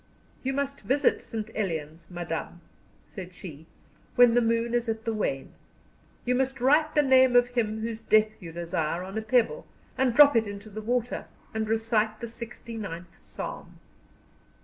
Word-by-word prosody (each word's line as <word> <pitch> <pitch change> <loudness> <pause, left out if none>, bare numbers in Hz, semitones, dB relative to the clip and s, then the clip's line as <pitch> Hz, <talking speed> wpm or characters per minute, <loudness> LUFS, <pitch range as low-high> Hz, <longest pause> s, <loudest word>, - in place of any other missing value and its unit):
"You 265 +1 -2
must 280 0 -2
visit 280 +2 +2
St. 220 -1 -6
Elian's, 165 -4 -4
madam," 175 -1 -5 0.4
said 180 -1 -9
she, 160 -3 -10 0.5
"when 245 -1 +7
the 245 - +4
moon 230 0 +1
is 240 -1 0
at 220 0 -3
the 225 - 0
wane. 135 -11 -2 0.7
You 250 - +2
must 265 +1 0
write 300 +5 +3
the 295 - +5
name 260 -2 +5
of 245 0 +5
him 220 -3 -1
whose 225 0 -4
death 215 -1 +2
you 170 -3 -8
desire 170 0 -2
on 190 +2 -8
a 220 - -1
pebble, 245 - +1 0.3
and 255 -3 +2
drop 290 -3 +8
it 225 -2 +3
into 205 +1 -8
the 215 +2 -6
water, 245 +2 -2 0.3
and 220 -1 -2
recite 220 -1 +1
the - - -4
sixty 235 0 -8
ninth 175 -5 -7
Psalm." - - -8
225 Hz, 170 wpm, -27 LUFS, 195-245 Hz, 0.7 s, drop